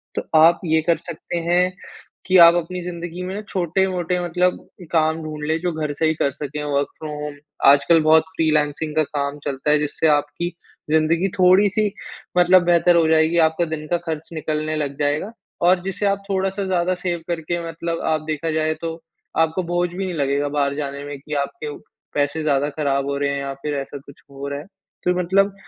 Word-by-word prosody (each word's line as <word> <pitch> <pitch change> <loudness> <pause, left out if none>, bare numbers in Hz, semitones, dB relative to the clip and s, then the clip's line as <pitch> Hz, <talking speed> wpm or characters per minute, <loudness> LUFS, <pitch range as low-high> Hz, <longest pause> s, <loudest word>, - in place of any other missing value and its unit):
तो - - -1 0.2
आप 165 +2 +6
ये 160 -1 +2
कर 170 - +4
सकते 175 - -6
हैं 180 +1 +3 0.5
कि 185 0 +3
आप 170 0 +9
अपनी 175 +1 -3
ज़िन्दगी 175 0 -6
में 195 +3 -4
छोटे-मोटे 180 0 0
मतलब 180 +1 +1 0.3
काम 160 0 +2
ढूँढ 155 -1 -6
लें, 160 +1 +1
जो 175 -1 -1
घर 155 -2 -3
से 160 +2 0
ही 160 - +2
कर 140 -2 0
सकें 150 +1 -5
वर्क 140 -1 0
फ्रॉम 155 -1 -6
होम। 150 -1 -5 0.4
आजकल 150 +4 +5
बहुत 160 +1 +6
फ़्रीलांसिंग 155 -1 0
का 155 - +5
काम 140 0 -3
चलता 140 +1 -2
है, 150 - +5
जिससे 150 +2 -1
आपकी 150 +3 +1 0.4
ज़िंदगी 160 +4 +2
थोड़ी-सी 200 +3 +4 0.5
मतलब 180 +1 +6
बेहतर 175 0 +4
हो 165 -1 +4
जाएगी, 160 +1 +3
आपका 160 +1 +3
दिन 155 -2 -5
का 175 - +2
खर्च 160 -1 -4
निकलने 155 0 -2
लग 145 -2 -3
जायेगा 150 +9 0 0.4
और 180 -1 +4
जिससे 195 +2 -2
आप 200 0 0
थोड़ा-सा 195 +1 -1
ज़्यादा 185 0 +1
सेव 175 -2 -1
करके 170 0 -2
मतलब 165 0 -4
आप 155 - +1
देखा 155 +2 -2
जाये 155 0 0
तो 165 -1 -3 0.5
आपको 160 +4 -2
बोझ 175 0 +1
भी 190 +2 -4
नहीं 180 - -4
लगेगा 140 -1 0
बाहर 140 -1 0
जाने 140 -1 -4
में, 145 -1 -6
कि 150 +1 -6
आपके 145 +1 -3 0.4
पैसे 145 +2 0
ज़्यादा 145 -1 +1
खराब 140 -2 -1
हो 140 - -1
रहे 140 0 0
हैं 140 - -2
या 140 0 -4
फिर 150 -1 -2
ऐसा 140 +1 -5
कुछ 140 - -15
हो 140 +1 -6
रहा 140 0 -4
है। 155 - -12 0.4
तो 180 - +2
मतलब 195 +3 +2
160 Hz, 195 wpm, -21 LUFS, 150-175 Hz, 0.5 s, आप